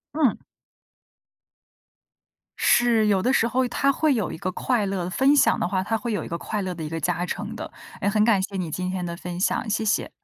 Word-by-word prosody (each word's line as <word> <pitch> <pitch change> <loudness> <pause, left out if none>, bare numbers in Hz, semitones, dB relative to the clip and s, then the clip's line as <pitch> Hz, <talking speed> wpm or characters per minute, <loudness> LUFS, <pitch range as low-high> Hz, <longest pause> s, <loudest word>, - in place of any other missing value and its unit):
嗯。 285 -8 +2 2.2
是， 230 -3 +4
有 195 -2 +3
的 255 +5 +1
时 230 - +3
候 255 +2 +1
它 275 +3 +1
会 305 0 +2
有 220 -6 -1
一 - - -6
个 185 +2 -3
快 220 +2 0
乐， 185 -2 -2
分 270 +8 +3
享 - - +4
的 - - 0
话， 185 0 -1
它 225 +2 -1
会 235 -1 -3
有 190 - -2
一 - - -7
个 170 - -3
快 210 +2 -3
乐 185 -1 -3
的 160 -2 -7
一 150 - -4
个 165 0 -3
加 175 +2 -1
成 - - -5
的。 - - -7 0.3
哎， 200 - +1
很 210 +1 +2
感 210 -4 +3
谢 195 +1 -5
你 175 -4 -3
今 185 +2 -3
天 185 -1 -3
的 170 0 -4
分 180 0 -6
享， 215 +4 0
谢 220 +1 0
谢。 215 - 0
200 Hz, 245 characters per minute, -24 LUFS, 180-235 Hz, 2.2 s, 是